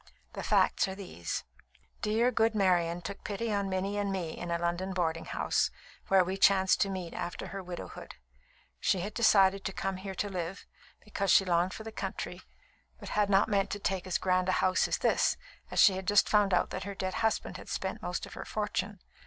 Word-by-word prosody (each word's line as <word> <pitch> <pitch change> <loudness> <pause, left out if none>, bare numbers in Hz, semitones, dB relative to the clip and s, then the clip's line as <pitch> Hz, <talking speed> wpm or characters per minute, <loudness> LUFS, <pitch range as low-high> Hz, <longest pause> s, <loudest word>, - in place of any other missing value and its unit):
The - - -5
facts - - +3
are 190 - -5
these: 130 - -5 0.6
Dear, 225 +4 +2
good 225 -1 +2
Marian 175 -3 +2
took 200 +3 -7
pity 215 +2 -2
on 200 -1 0
Minnie 195 +2 -1
and 200 -1 -1
me 175 -4 -3
in 175 - -6
a 170 - +1
London 175 +3 -2
boarding 165 -3 -1
house, - - 0 0.4
where 190 -1 +5
we 185 +2 -3
chanced 190 -1 +4
to 200 - +2
meet 185 -3 -5
after 175 -1 -5
her 195 +1 -5
widowhood. 180 -1 -8 0.6
She 185 - +1
had 205 +3 -4
decided 195 -4 +4
to - - -2
come 195 0 -3
here 190 0 -6
to 205 - -1
live, 185 -1 -5 0.4
because 200 -2 -2
she 195 - +6
longed 175 +1 +1
for 220 - -8
the 225 - -7
country, 190 -3 -5 0.6
but - - -8
had 210 -1 +1
not 195 0 +4
meant 200 -2 +1
to 205 - -4
take 190 -2 -2
as 185 - +1
grand 185 0 +1
a - - +3
house 185 0 +2
as - - 0
this, - - +2 0.3
as - - -6
she 200 - +8
had 190 0 -5
just 205 0 +5
found 205 -2 +3
out 180 - +2
that - - -4
her 200 +1 -6
dead 185 -1 -3
husband 220 -1 0
had - - -11
spent - - -3
most - - -3
of - - -12
her - - -6
fortune. 210 -1 -3
190 Hz, 210 wpm, -30 LUFS, 180-205 Hz, 0.6 s, she